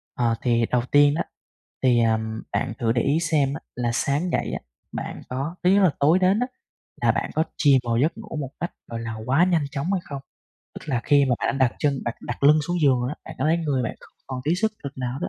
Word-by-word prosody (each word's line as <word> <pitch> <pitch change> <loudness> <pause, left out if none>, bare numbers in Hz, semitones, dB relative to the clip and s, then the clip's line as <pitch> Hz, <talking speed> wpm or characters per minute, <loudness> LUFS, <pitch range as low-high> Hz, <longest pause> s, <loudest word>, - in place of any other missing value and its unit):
Ờ, 115 -2 +1
thì 120 -2 +2
đầu 125 -1 +3
tiên 145 0 +6
đó, - - 0 0.6
thì, 125 -2 +4
ờ, 115 -1 +3 0.4
bạn 125 -4 -1
thử 115 -2 +1
để 120 - +1
ý 145 +6 +2
xem 150 -5 +1
á 155 - -6
là 120 -1 -1
sáng 150 +8 0
dậy - - -1
á, - - -2 0.3
bạn - - -5
có 135 +7 -3
thứ 180 - +4
nhất 200 +1 +5
là 180 - +5
tối 155 +6 +4
đến 190 +3 +3
á, 250 - 0 0.6
là - - +4
bạn - - -2
có 160 - +2
chìm 140 -3 +5
vào 115 - +1
giấc 160 - +1
ngủ 215 -7 -8
một 135 -3 -5
cách, 175 - -3 0.2
gọi 115 -1 -4
là, 115 -1 -4
quá 140 +7 +4
nhanh 170 -5 +2
chóng 145 +6 -2
hay 190 - +1
không. 140 -2 -7 0.5
Tức - - -10
là 125 -4 0
khi 145 -1 +5
mà 130 - +2
bạn 135 - -1
đã 130 -2 +5
đặt - - -18
chân 140 -2 +1
đặt 120 - -2
đặt 120 - -6
lưng 150 +2 +7
xuống 175 -1 -1
giường 130 -4 +4
đó, 145 - -3
bạn - - -8
có 130 - -1
thấy 160 +2 +3
người 145 -6 0
bạn 115 - -4
không - - -18
còn 130 -1 -5
tí 160 +4 +2
sức 220 +3 0
lực 140 -1 -7
nào 125 +1 -3
đó, - - -2
140 Hz, 265 wpm, -24 LUFS, 125-160 Hz, 0.6 s, lưng